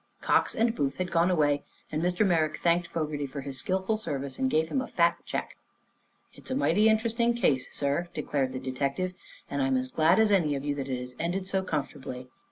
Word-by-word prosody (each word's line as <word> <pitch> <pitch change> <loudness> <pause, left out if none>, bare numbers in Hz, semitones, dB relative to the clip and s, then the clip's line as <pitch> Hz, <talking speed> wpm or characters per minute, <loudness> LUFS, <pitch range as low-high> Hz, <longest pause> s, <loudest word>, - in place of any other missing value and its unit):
Cox - - +2
and 230 0 +2
Booth 140 - -1
had 185 -1 -2
gone 170 +2 +3
away 145 -5 +2 0.3
and 155 - -1
Mr. 180 +4 +2
Merrick 160 -5 +2
thanked 175 0 +2
Fogerty 150 -3 -3
for 140 +1 -6
his 135 -1 -3
skillful 190 +3 0
service 140 -9 -3
and 265 - +2
gave 160 -7 +1
him 265 - 0
a - - -5
fat 170 0 +2
check. - - -4 0.8
"It's - - -13
a 260 - -1
mighty 220 -5 +4
interesting 230 +2 +2
case, 135 - +1
sir," 145 +5 -1
declared 140 -3 -1
the 130 - -4
detective, 140 +7 -2 0.3
"and 140 0 -2
I'm 135 -1 +2
as 130 0 -2
glad 160 +3 +4
as 220 -1 +4
any 165 -7 +3
of 140 +1 -4
you 145 - 0
that 140 -1 -5
it 130 -1 -1
has 125 0 -7
ended 180 +3 -1
so 190 0 +1
comfortably. 135 -6 -4
160 Hz, 210 wpm, -28 LUFS, 140-190 Hz, 0.8 s, mighty